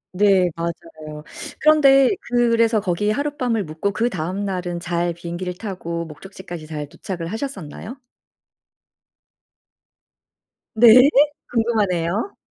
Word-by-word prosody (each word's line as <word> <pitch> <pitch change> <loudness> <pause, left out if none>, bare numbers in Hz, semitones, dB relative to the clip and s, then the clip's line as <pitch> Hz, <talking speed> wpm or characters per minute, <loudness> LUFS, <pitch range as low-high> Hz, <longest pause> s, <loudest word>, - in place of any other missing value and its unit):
네 190 -2 +3
맞아요. 155 -2 -7 0.4
그런데 275 -4 +5 0.2
그래서 230 -2 +3
거기에 205 +2 -1
하룻밤을 255 -4 -1
묵고 165 +5 -3
그다음 195 -3 -2
날은 180 -2 -3
잘 175 0 -1
비행기를 175 +1 -5
타고 170 -5 -5
목적지까지 175 0 -10
잘 150 -2 -5
도착을 175 +3 -7
하셨었나요? 225 - -6 2.8
네. 240 +4 +8 0.4
궁금하네요. 210 - 0
190 Hz, 245 characters per minute, -21 LUFS, 170-230 Hz, 2.8 s, 네